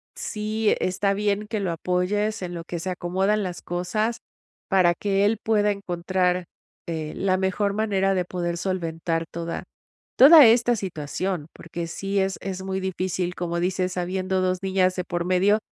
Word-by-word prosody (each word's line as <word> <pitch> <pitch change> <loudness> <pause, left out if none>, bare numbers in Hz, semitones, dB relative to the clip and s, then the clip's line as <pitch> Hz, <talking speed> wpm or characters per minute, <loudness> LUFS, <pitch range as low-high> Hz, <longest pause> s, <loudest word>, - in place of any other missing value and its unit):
sí, 215 0 -1
e - - +2
está 195 +2 0
bien 205 0 0
que 220 -1 -1
lo 190 -3 -1
apoyes 185 +6 -1
en 175 -1 -5
lo 170 -1 -5
que 170 0 -5
se 185 +3 -3
acomodan 190 +4 0
las 180 -2 -5
cosas 215 +6 -2 0.5
para 185 -3 +4
que 200 +1 +1
él 220 +2 +2
pueda 210 -2 +2
encontrar, 180 -1 -1 0.4
eh, 160 -2 -3
la 190 -1 +1
mejor 190 +2 0
manera 200 -2 +1
de 180 - +1
poder 175 -1 -3
solventar 165 -2 -2
toda 170 0 -5 0.6
toda 295 +2 +10
esta 235 +1 +4
situación. 180 -2 -3
Porque 170 0 -6
sí 195 +4 -3
es 190 0 0
es 190 -1 -5
muy 190 0 -2
difícil, 185 -1 -2
como 170 -1 -2
dices, 185 +1 -1
habiendo 185 +1 -1
2 185 0 0
niñas 185 -1 +2
de 180 - -2
por 175 -1 -3
medio, 190 +4 +3
185 Hz, 170 wpm, -24 LUFS, 175-200 Hz, 0.6 s, toda